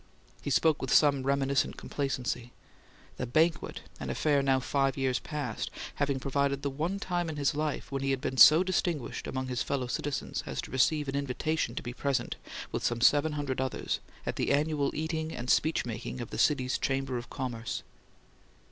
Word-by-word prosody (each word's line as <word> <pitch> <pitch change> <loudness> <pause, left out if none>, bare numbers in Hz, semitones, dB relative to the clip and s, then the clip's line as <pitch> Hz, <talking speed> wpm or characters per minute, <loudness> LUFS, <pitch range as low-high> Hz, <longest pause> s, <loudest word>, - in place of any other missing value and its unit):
He - - -4
spoke 160 -2 +3
with 130 - -2
some 140 -3 +5
reminiscent 140 +1 +1
complacency; 125 -3 -3 0.6
"the 125 - -3
banquet," 155 +5 +1 0.2
an - - -4
affair 145 -2 +2
now 135 -1 +3
five 135 0 0
years 130 -2 +1
past, 145 -8 -4 0.3
having 140 -2 +1
provided 140 +1 0
the 140 - -1
one 160 +8 -2
time 175 -3 -1
in 155 - -4
his 145 0 +1
life 150 -1 -2
when 135 -1 -2
he 135 - 0
had 135 -1 +1
been 130 -1 -3
so 155 +7 +9
distinguished 175 -6 -1
among 130 0 -3
his 125 -2 -2
fellow 135 -3 -1
citizens 140 +3 -2
as - - -4
to - - -9
receive 145 +3 +2
an 135 - -2
invitation 140 -1 -1
to - - -4
be 120 - -5
present, 140 +1 -1 0.4
with - - -3
some 120 -1 +1
seven 145 +5 +4
hundred 140 -3 -2
others, 130 -1 -2 0.3
at - - -3
the - - +1
annual 145 -1 +2
eating 160 0 -2
and 120 +2 -1
speech 160 -3 +2
making 120 +2 -5
of 120 - -6
the - - -4
city's 130 -4 +2
Chamber 135 -2 -1
of 120 - -10
Commerce. 120 -3 -4
140 Hz, 185 wpm, -30 LUFS, 130-150 Hz, 0.6 s, so